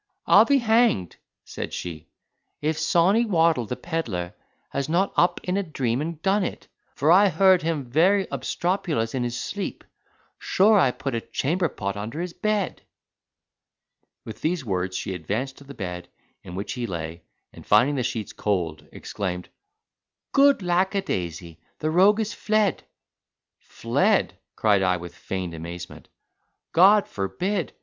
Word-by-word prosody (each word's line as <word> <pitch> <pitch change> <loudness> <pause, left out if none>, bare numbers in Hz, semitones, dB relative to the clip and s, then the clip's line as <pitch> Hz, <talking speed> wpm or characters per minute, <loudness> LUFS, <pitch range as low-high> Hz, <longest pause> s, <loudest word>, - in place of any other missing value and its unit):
"I'll - - +7
be 280 - +4
hanged," 225 - +2 0.3
said - - -6
she, 80 -3 -7 0.5
"if 155 +1 -1
Sawney 190 +7 +3
Waddle, 165 - +2
the 125 - -3
pedlar, 115 - -4 0.4
has 140 +1 -2
not 185 +4 +1
got - - +3
up 175 - 0
in 180 +1 -1
a - - +2
dream 135 -8 -2
and 160 0 -4
done 195 +1 +2
it, - - -5 0.3
for 150 +3 +2
I 195 +3 +6
heard 190 -1 +4
him 160 -4 -2
very 180 +10 +3
obstropulous 170 - -1
in 130 -2 -1
his 120 0 -3
sleep.—Sure 205 +1 -1
I 135 - +4
put 135 +1 -4
a 115 - -1
chamberpot 140 - -2
under 110 +9 -5
his 175 0 -4
bed!" 210 -1 -1 1.4
With 110 - -9
these 160 -3 -1
words 95 -2 -2
she 95 - -4
advanced 105 - -4
to 140 - -15
the 140 0 -11
bed, 90 -3 -6 0.3
in 90 - -9
which 100 +1 -4
he 120 -1 -3
lay, 85 -2 -5 0.3
and, - - -12
finding 140 +4 +4
the 135 - -1
sheets 115 -3 -3
cold, 85 -7 -2
exclaimed, 90 -3 -5 0.8
"Good 280 -6 +4
lackadaisy! 95 - -1 0.2
The 155 0 -2
rogue 195 +6 +5
is 215 -1 -2
fled." 215 -3 +1 0.8
"Fled," - - 0 0.2
cried 105 -3 +3
I, 90 -1 +2
with 85 0 -9
feigned 90 -1 -5
amazement, 85 +2 -8 0.6
"God 200 +4 +6
forbid! 165 - -2
140 Hz, 145 wpm, -24 LUFS, -, 1.4 s, I'll